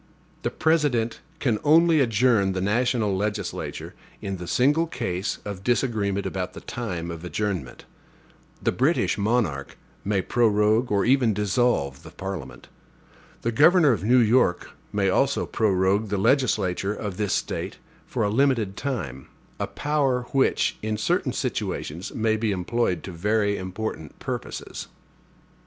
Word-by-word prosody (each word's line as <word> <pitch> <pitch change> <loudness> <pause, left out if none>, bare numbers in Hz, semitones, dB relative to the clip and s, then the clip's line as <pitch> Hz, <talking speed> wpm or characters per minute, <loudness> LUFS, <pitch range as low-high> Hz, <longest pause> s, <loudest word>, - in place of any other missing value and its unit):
The - - -1
President 145 -8 +1 0.2
can 120 -8 0
only 160 +1 +5
adjourn 115 -4 +3
the 95 - -2
national 110 +1 +1
legislature 105 +2 -3 0.3
in 95 -1 -4
the 90 -1 -7
single 145 - +3
case 95 - -3
of 100 -2 -6
disagreement 110 -5 0
about 90 -1 -3
the - - -9
time 90 -8 -4
of 85 0 -8
adjournment. 90 - -3 0.8
The - - +2
British - - +1
monarch 100 - 0 0.3
may 100 -2 0
prorogue 110 +1 +2
or 100 -1 +2
even 125 -4 +3
dissolve 105 - +1
the - - -11
Parliament. 95 -3 -7 0.8
The 115 - +1
governor 150 +4 +6
of 100 -7 -1
New 120 +4 +4
York 115 -6 +3 0.2
may 100 -1 +1
also 135 +8 +2
prorogue 100 0 +1
the 100 - 0
legislature 100 -4 +1
of 100 -4 -5
this 105 -3 0
State - - -3 0.3
for 115 - -1
a 105 - +1
limited 115 -5 +2
time; 80 - -4 0.3
a - - -1
power 140 -4 0
which, 135 -1 +2
in 110 0 -2
certain 105 - 0
situations, 85 +6 -3
may 110 -1 +1
be 110 -1 0
employed 95 -1 -1
to 95 - -6
very 100 +4 +1
important 95 -4 -5
purposes. - - -5
105 Hz, 140 wpm, -25 LUFS, 95-125 Hz, 0.8 s, governor